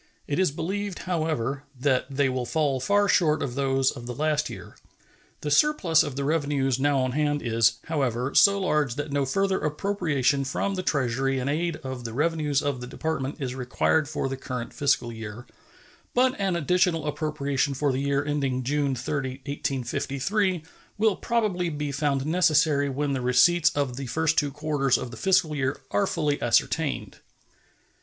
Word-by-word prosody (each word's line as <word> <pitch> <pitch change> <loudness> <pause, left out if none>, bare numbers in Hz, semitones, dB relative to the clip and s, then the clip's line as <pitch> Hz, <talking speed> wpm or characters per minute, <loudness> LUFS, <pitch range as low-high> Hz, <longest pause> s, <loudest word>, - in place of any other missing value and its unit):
It 145 - -2
is 190 - +3
believed, 190 +6 -4
however, 155 -7 -1 0.2
that 130 -1 +1
they 140 0 +1
will 130 -2 -2
fall 145 -4 0
far 205 +9 +2
short 155 -6 +3
of 125 - -3
those 135 0 +1
of 120 -3 -9
the 125 - -5
last 150 0 0
year. - - -10 0.7
The 150 - -3
surplus 180 - +4
of 145 -3 -3
the 140 - -2
revenues 140 -3 0
now 145 0 +2
on 130 0 0
hand 145 +1 0
is, 115 -1 +3
however, 135 -4 -1
so 200 0 +6
large 150 -9 +1
that 145 0 -4
no 140 -1 0
further 195 +6 +1
appropriation 150 -4 0
from 140 +9 -2
the 185 - -2
Treasury 135 -3 0
in 130 0 -2
aid 165 +3 0
of 130 -2 -5
the 115 -1 -6
revenues 150 0 0
of 140 -3 -2
the 125 - -6
Department 145 0 -3
is 130 -3 -3
required 135 +4 0
for 155 -3 -2
the 135 - -3
current 125 -2 -5
fiscal 120 -4 +1
year, 110 +1 -8 0.7
but 255 +1 +4
an 195 -3 0
additional 170 0 +1
appropriation 145 -2 -1
for 145 +1 +1
the 130 - -1
year 140 0 0
ending 135 -3 -1
June 140 +1 0
30, 130 +1 -4
1853, 145 - -1 0.3
will 215 -1 +3
probably 205 -7 0
be 150 -2 -3
found 140 -1 0
necessary 155 -3 +3
when 140 +1 -1
the 130 - -2
receipts 160 +7 +4
of 140 -4 -1
the 135 -1 -5
first 160 +4 +1
two 145 - +2
quarters 145 -2 0
of 125 -2 -6
the - - -8
fiscal 180 -3 +2
year 135 -1 -1
are 100 - +2
fully 150 -2 -1
ascertained. 140 +5 0
145 Hz, 175 wpm, -26 LUFS, 135-160 Hz, 0.7 s, so